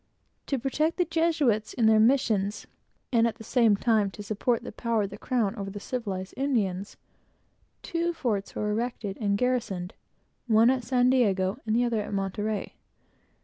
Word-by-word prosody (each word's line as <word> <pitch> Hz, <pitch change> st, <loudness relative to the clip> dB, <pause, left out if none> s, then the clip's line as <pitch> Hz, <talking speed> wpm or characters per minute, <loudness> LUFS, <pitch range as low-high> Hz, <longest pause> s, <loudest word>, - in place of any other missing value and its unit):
To 275 Hz, -, 0 dB
protect 305 Hz, +6 st, 0 dB
the 355 Hz, -, +2 dB
Jesuits 310 Hz, -10 st, +1 dB
in 235 Hz, -, +2 dB
their 220 Hz, 0 st, +6 dB
missions, 215 Hz, -4 st, +2 dB, 0.5 s
and 230 Hz, -1 st, +4 dB
at 225 Hz, -, -3 dB
the 225 Hz, -, -11 dB
same 230 Hz, -2 st, +3 dB
time 215 Hz, -1 st, +2 dB
to 205 Hz, +2 st, -9 dB
support 220 Hz, +3 st, -1 dB
the -, -, -7 dB
power 230 Hz, -3 st, 0 dB
of 200 Hz, -, -4 dB
the 205 Hz, -, -8 dB
crown 230 Hz, -5 st, 0 dB
over 200 Hz, -3 st, -5 dB
the 205 Hz, +1 st, -7 dB
civilized 200 Hz, -6 st, -4 dB
Indians, 210 Hz, -8 st, -1 dB, 0.9 s
two 340 Hz, 0 st, -1 dB
forts 225 Hz, -11 st, -2 dB
were 210 Hz, 0 st, -1 dB
erected 220 Hz, -3 st, -3 dB
and 200 Hz, -1 st, +1 dB
garrisoned, 210 Hz, -7 st, -1 dB, 0.5 s
one 225 Hz, +2 st, +5 dB
at 260 Hz, -2 st, -1 dB
San 250 Hz, +1 st, +3 dB
Diego, 200 Hz, -4 st, +2 dB
and 215 Hz, -, +1 dB
the 240 Hz, -, +3 dB
other 235 Hz, -3 st, 0 dB
at 205 Hz, 0 st, -4 dB
Monterey. 205 Hz, +2 st, -2 dB
225 Hz, 170 wpm, -27 LUFS, 205-250 Hz, 0.9 s, their